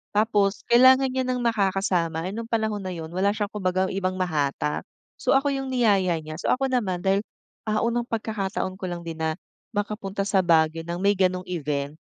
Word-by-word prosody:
Tapos 210 -2 +2
kailangan 260 +2 +7
niya 260 0 -1
ng 250 -1 -1
makakasama, 190 -6 +1
eh - - -6
nung 230 0 -5
panahon 220 -2 0
na 185 - -4
yun 160 0 -7
wala 190 +3 +1
siyang 205 -1 -2
kumbaga 185 -2 0
ibang 185 -1 -1
mahatak. 150 -4 -1 0.4
So, - - +2
ako 275 +1 +3
yung 270 0 -3
niyaya 200 -7 +3
niya. 155 0 -7
So, - - -3
ako 270 +1 +1
naman 190 -8 0
dahil, 195 +1 +2 0.5
ah, 215 0 +1
unang 235 +1 0
pagkakataon 200 -4 -3
ko - - -4
lang 175 -1 -5
din 165 -1 -6
na 160 0 0 0.4
makapunta 205 -1 -2
sa 195 - +3
Baguio 165 -1 +3
ng 175 +1 -3
may 200 - +5
gano'ng 185 -1 +1
event. 145 -4 -2
195 Hz, 190 wpm, -25 LUFS, 175-220 Hz, 0.5 s, kailangan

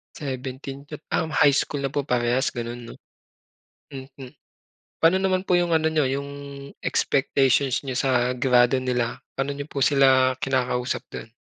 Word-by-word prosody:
17 135 0 -6 0.3
Um, 160 - 0
high 145 -1 +5
school 145 +1 -1
na 135 - -2
po 145 - 0
parehas 125 0 +1
gano'n, 120 0 -5
'no. - - -10 1.0
Mhm. 135 -1 -10 0.7
Pa'no 165 +3 +5
naman 190 -1 0
po 180 -2 +2
yung 175 -1 0
ano 160 0 +1
n'yo, 155 -4 +2
yung 140 +2 -3 0.5
expectations 135 -1 +1
n'yo 130 -2 -4
sa 125 -2 +1
grado 125 0 +3
nila? 125 -2 -2 0.2
Pano 135 +1 -2
n'yo 140 0 -6
po 140 -3 -2
sila 130 -2 +4
kinakausap 125 -2 -1
dun? 110 - -8
135 Hz, 145 wpm, -24 LUFS, 125-140 Hz, 1.0 s, high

